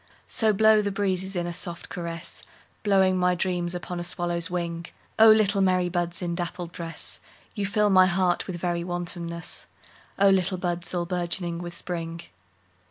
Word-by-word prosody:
So 220 Hz, -1 st, +3 dB
blow 215 Hz, +1 st, +5 dB
the 205 Hz, -, -1 dB
breezes 190 Hz, -1 st, -1 dB
in 175 Hz, -1 st, -1 dB
a 175 Hz, -, -4 dB
soft 170 Hz, 0 st, -3 dB
caress, 170 Hz, -1 st, -6 dB, 0.4 s
Blowing 190 Hz, -3 st, +3 dB
my 180 Hz, 0 st, +3 dB
dreams 175 Hz, -1 st, -1 dB
upon 175 Hz, 0 st, -5 dB
a -, -, -3 dB
swallow's 175 Hz, 0 st, 0 dB
wing;O 175 Hz, +5 st, +1 dB
little 210 Hz, -2 st, +5 dB
merry 185 Hz, -2 st, +2 dB
buds 175 Hz, 0 st, -1 dB
in 170 Hz, -1 st, -1 dB
dappled 175 Hz, 0 st, -4 dB
dress, 165 Hz, -2 st, -6 dB, 0.3 s
You 205 Hz, -2 st, -2 dB
fill 210 Hz, +1 st, +2 dB
my 185 Hz, -1 st, +7 dB
heart 180 Hz, -1 st, +1 dB
with 185 Hz, -, -4 dB
very 175 Hz, 0 st, -2 dB
wantonness—O 175 Hz, +2 st, -4 dB
little 190 Hz, -1 st, +3 dB
buds 175 Hz, -1 st, -2 dB
all 175 Hz, -1 st, 0 dB
bourgeoning 175 Hz, -1 st, -2 dB
with 175 Hz, 0 st, -6 dB
Spring! 165 Hz, -1 st, -5 dB
180 Hz, 160 wpm, -26 LUFS, 170-190 Hz, 0.4 s, my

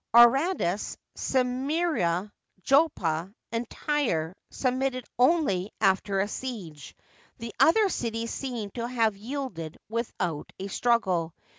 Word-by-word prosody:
Aradus, 240 Hz, -, +4 dB, 0.2 s
Symiria, 255 Hz, -, 0 dB, 0.3 s
Joppa, 190 Hz, -, +2 dB, 0.2 s
and 230 Hz, 0 st, -2 dB
Tyre 190 Hz, -, -1 dB
submitted 255 Hz, -1 st, -1 dB
only 250 Hz, -, +3 dB
after 195 Hz, +1 st, +2 dB
a 200 Hz, -, 0 dB
siege; 200 Hz, -, -6 dB, 0.4 s
the 230 Hz, -1 st, -7 dB
other 420 Hz, +6 st, +6 dB
cities 230 Hz, -8 st, -2 dB
seem 240 Hz, -7 st, -4 dB
to 235 Hz, +1 st, -3 dB
have 230 Hz, -4 st, +1 dB
yielded 210 Hz, -, -5 dB
with 230 Hz, +1 st, -2 dB
out 165 Hz, -5 st, -3 dB
a 195 Hz, +1 st, -4 dB
struggle. 185 Hz, -9 st, +1 dB
230 Hz, 110 wpm, -27 LUFS, 190-265 Hz, 0.4 s, other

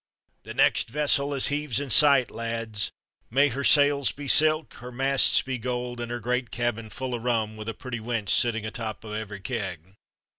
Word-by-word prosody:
"The -, -, -10 dB
next -, -, +3 dB
vessel 145 Hz, +1 st, +1 dB
as 140 Hz, -2 st, +2 dB
heaves 145 Hz, -3 st, -1 dB
in 140 Hz, -3 st, -5 dB
sight, 140 Hz, -1 st, +6 dB
lads! 115 Hz, -3 st, -3 dB, 0.4 s
May 140 Hz, +5 st, +3 dB
her 140 Hz, +2 st, -4 dB
sails 145 Hz, -2 st, +4 dB
be 145 Hz, 0 st, -9 dB
silk, 155 Hz, +2 st, +3 dB
her 125 Hz, +1 st, -9 dB
masts 135 Hz, +2 st, +3 dB
be 130 Hz, -2 st, -4 dB
gold, 125 Hz, 0 st, -4 dB
and 120 Hz, 0 st, -5 dB
her 120 Hz, 0 st, -4 dB
great 125 Hz, +2 st, -2 dB
cabin 115 Hz, -2 st, -3 dB
full 130 Hz, +2 st, -5 dB
o' 120 Hz, -, -2 dB
rum, 115 Hz, -2 st, -1 dB
with 110 Hz, +1 st, -7 dB
a 115 Hz, -, -5 dB
pretty 120 Hz, 0 st, -6 dB
wench 110 Hz, -3 st, -4 dB
sittin' 115 Hz, +2 st, +2 dB
atop 110 Hz, 0 st, -6 dB
o' 105 Hz, -, -8 dB
every 105 Hz, -2 st, -6 dB
keg!" 95 Hz, -6 st, -5 dB
120 Hz, 190 wpm, -25 LUFS, 110-135 Hz, 0.4 s, sight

